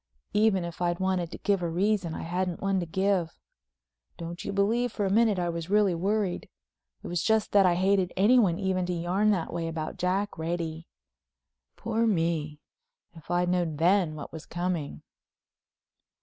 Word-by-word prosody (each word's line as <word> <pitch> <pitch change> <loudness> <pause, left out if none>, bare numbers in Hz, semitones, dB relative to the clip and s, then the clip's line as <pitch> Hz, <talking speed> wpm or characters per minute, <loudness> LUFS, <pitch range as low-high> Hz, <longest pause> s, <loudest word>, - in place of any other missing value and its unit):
Even 210 -3 +3
if 170 +1 -8
I'd 175 0 +1
wanted 185 -3 0
to - - -8
give 200 -2 0
a 170 - -1
reason 185 -1 0
I - - -5
hadn't 180 +1 -2
one 195 -1 0
to 175 - -3
give. 190 -1 0 0.8
Don't 170 +1 -6
you - - -3
believe 220 +5 +1
for 205 -2 -2
a 190 - 0
minute 220 -1 +3
I 175 -1 0
was 170 0 -5
really 205 -2 +3
worried—it 175 - -4
was 175 -1 -1
just 220 +3 +1
that 200 -2 +5
I 175 - +3
hated 190 0 +2
anyone 205 -3 +4
even 190 -2 -1
to 180 - -1
yarn 180 +5 +1
that 185 -6 0
way 165 -1 -2
about 160 -1 -4
Jack 185 +1 -1
Reddy. 165 0 -3 0.9
Poor—me—if 170 - -3
I'd 175 0 +1
known 175 -3 0
then 170 0 +2
what 150 - -8
was 160 -1 -9
coming! 175 - -3
180 Hz, 165 wpm, -28 LUFS, 170-200 Hz, 0.9 s, that